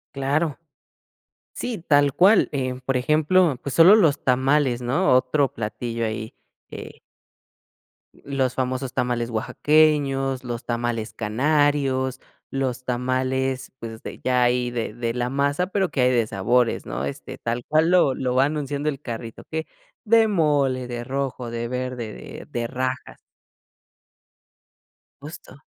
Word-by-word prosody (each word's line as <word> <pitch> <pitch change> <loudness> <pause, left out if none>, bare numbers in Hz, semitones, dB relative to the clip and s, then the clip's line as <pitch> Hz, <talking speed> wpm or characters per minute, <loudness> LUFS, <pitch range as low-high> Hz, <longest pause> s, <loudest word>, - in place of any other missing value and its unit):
Claro. 140 +3 0 0.9
Sí, 245 -3 -4
tal 145 -2 +4
cual, 190 +8 +5
eh, 130 -2 -3
por 135 -1 +1
ejemplo, 155 +3 +3
pues, 140 - -4
solo 170 +7 +8
los 165 -10 +3
tamales, 130 0 +2
¿no? 130 +7 +2
Otro 130 +2 +2
platillo 115 +1 -3
ahí, 110 0 -5 0.3
eh - - -9 1.1
Los 135 -2 -2
famosos 130 0 -2
tamales 120 -1 -1
oaxaqueños, 135 +1 +2
los 120 -2 -5
tamales 120 -2 -2
canarios, 130 +2 +1 0.3
los 130 -2 -2
tamales, 130 +1 -1
pues, 115 -1 -8
de - - -8
ya 125 -1 +2
ahí 125 0 +1
de 120 -3 -4
de 115 0 -3
la 125 0 -1
masa 140 +5 +1
pero 190 -1 0
que 135 -2 -1
hay 125 0 +4
de 120 -3 +2
sabores, 115 +5 +1
¿no? 70 - -4
Este, 70 - -7
tal 120 +1 -3
cual 155 +2 +3
lo 175 -7 +4
lo 125 -1 -2
va 130 +1 +5
anunciando 145 0 -3
el 140 -2 -2
carrito 115 -3 -7
que, 160 0 -3 0.4
de 225 0 +5
mole, 145 -9 +1
de 120 -1 -5
rojo, 130 -1 -3
de 115 0 -4
verde, 125 -3 -4
de - - -10
de 120 -1 -2
rajas. 130 +1 -4 2.0
Justo. 145 -1 -11
130 Hz, 135 wpm, -23 LUFS, 120-145 Hz, 2.0 s, solo